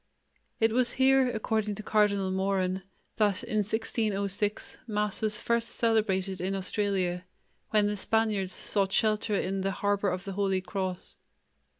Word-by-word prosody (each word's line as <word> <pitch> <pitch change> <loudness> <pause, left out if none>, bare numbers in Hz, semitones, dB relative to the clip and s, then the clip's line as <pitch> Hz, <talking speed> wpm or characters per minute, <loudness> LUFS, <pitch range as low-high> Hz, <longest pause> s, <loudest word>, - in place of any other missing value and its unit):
It 225 0 +3
was 245 0 +2
here, 265 0 +4
according 220 -2 -1
to 215 - -7
Cardinal 200 -3 +2
Moran, 190 -1 0 0.4
that 205 -3 +2
in 215 - -2
1606, 210 -1 -1
Mass 210 -2 -1
was 210 -1 +1
first 235 0 0
celebrated 195 -5 0
in 190 +2 -1
Australia, 185 -2 0 0.4
when 210 -1 +3
the 205 0 0
Spaniards 210 -2 0
sought 195 +1 -1
shelter 215 0 +1
in 195 0 -1
the 195 - 0
"Harbor 200 0 0
of 180 0 -3
the 195 -1 -5
Holy 195 -1 +1
Cross." 185 -1 -5
205 Hz, 140 wpm, -29 LUFS, 190-220 Hz, 0.4 s, here